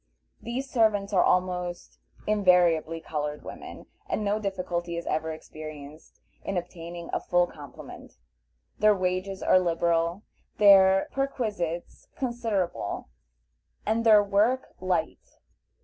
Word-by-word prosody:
These 250 +4 -4
servants 215 -5 +1
are 185 - +5
almost 180 -1 -1 0.3
invariably 180 -5 +3
colored 150 -1 -4
women, - - -9 0.2
and 220 - -1
no 205 +1 +1
difficulty 175 -4 -3
is 170 - -5
ever 160 +1 -1
experienced 155 -1 -10 0.2
in 195 - -3
obtaining 170 -1 -7
a - - +1
full 175 0 +2
complement. 150 -5 -12 0.7
Their 215 0 +5
wages 185 +1 -2
are 185 - +5
liberal, 170 +1 0 0.3
their 195 -2 +6
perquisites 210 -11 -3
considerable, 225 - -2 0.8
and 220 +2 +1
their 215 -2 +7
work 215 +6 +1
light. 180 -3 -3
185 Hz, 110 wpm, -27 LUFS, 170-210 Hz, 0.8 s, their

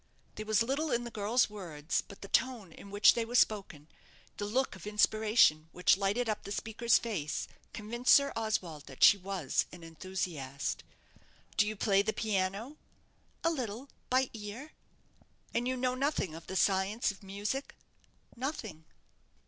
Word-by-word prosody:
There 215 0 -7
was 215 +1 +3
little 280 +6 -1
in 240 0 +1
the 240 - -7
girl's 225 +4 +2
words, 170 -7 -3
but 200 - -13
the - - -7
tone 235 -6 0
in 200 - -12
which 205 +1 +6
they 235 - 0
were 235 +2 -5
spoken, 195 -10 +1 0.5
the 205 - -3
look 255 +1 0
of 190 +2 -10
inspiration 210 -6 +3
which 180 +2 +4
lighted 200 +5 0
up 215 -1 -1
the 200 - -8
speaker's 225 +2 +2
face, 180 -11 -3 0.2
convinced 235 +4 -1
Sir 280 0 +3
Oswald 185 -10 -2
that 135 -2 -3
she - - +10
was 190 -6 -1
an 175 -2 -11
enthusiast. 165 -5 -4 0.7
"Do 210 - +3
you 215 - -2
play 200 -1 +3
the 215 +2 -1
piano?" 210 +6 -1 0.7
"A 330 - +3
little; 255 -2 -4 0.2
by 260 0 +2
ear." 225 +7 -7 0.8
"And 240 +1 0
you 255 0 -1
know 250 0 0
nothing 260 - -1
of 165 +1 -10
the 190 - -5
science 195 +4 +2
of 195 - -15
music?" 205 +7 -4 0.6
"Nothing." 230 - -5
210 Hz, 160 wpm, -32 LUFS, 190-240 Hz, 0.8 s, she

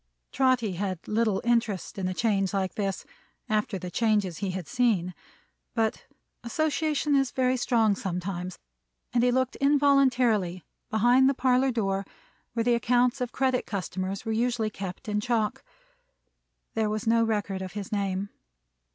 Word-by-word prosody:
Trotty 255 -5 +2
had 185 -1 -4
little 215 -2 +1
interest 230 -5 0
in 185 - -1
a 185 - -2
change 200 -3 +1
like 190 -1 -1
this, 195 -3 -3 0.4
after 210 -2 0
the 180 -1 -7
changes 205 -6 +1
he 200 - -2
had 185 -3 -4
seen; 220 -8 +1 0.6
but 225 -2 -1 0.4
association 300 +3 0
is 270 -2 +3
very 255 0 +1
strong 230 -4 +2
sometimes; 180 -3 -4 0.6
and 240 - +3
he 250 - +4
looked 260 +1 0
involuntarily 260 - +3 0.3
behind 245 +5 +4
the 275 - 0
parlor 260 +1 +3
door, 195 -5 0 0.5
where 230 -1 0
the 240 +1 +3
accounts 245 +2 +2
of 250 -1 -2
credit 260 -1 0
customers 190 0 -4
were 225 - -1
usually 230 -1 0
kept 195 +4 -7
in 210 0 0
chalk. 225 -2 -1 1.1
There 220 -1 0
was 215 0 -3
no 230 0 +4
record 205 -4 -1
of 185 -1 -6
his 205 -2 -6
name. 200 -1 -1
220 Hz, 150 wpm, -27 LUFS, 195-250 Hz, 1.1 s, he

